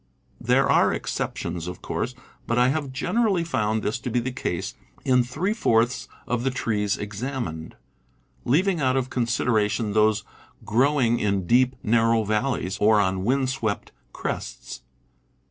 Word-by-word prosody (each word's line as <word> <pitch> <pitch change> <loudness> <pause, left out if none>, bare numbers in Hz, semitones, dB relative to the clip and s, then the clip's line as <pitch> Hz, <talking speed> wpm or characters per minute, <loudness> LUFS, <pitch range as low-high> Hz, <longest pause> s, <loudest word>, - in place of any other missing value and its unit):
There - - +3
are - - +4
exceptions, 85 0 -3
of 90 - -7
course, 125 +4 -3 0.3
but 115 - 0
I 125 +1 +5
have 140 -1 -2
generally 190 - +1
found 110 -9 -1
this 110 +3 -1
to 125 - -4
be 120 - +1
the 125 +2 -3
case 90 -8 -3 0.3
in 125 -1 +4
three 155 - -1
fourths 120 - +1 0.2
of 120 -1 -1
the 135 - +2
trees 105 -5 -1
examined, 105 - -5 0.7
leaving 170 +6 +2
out 130 -1 +2
of 130 -1 -2
consideration 115 -3 0
those 110 0 +3 0.4
growing 120 +1 +2
in 100 -3 0
deep, 125 +5 +3
narrow 115 0 +3
valleys, 105 -2 -1
or 105 0 +5
on 95 -1 +1
wind 130 +2 +1
swept 110 -6 -3 0.2
crests. - - -5
120 Hz, 145 wpm, -24 LUFS, 105-130 Hz, 0.7 s, I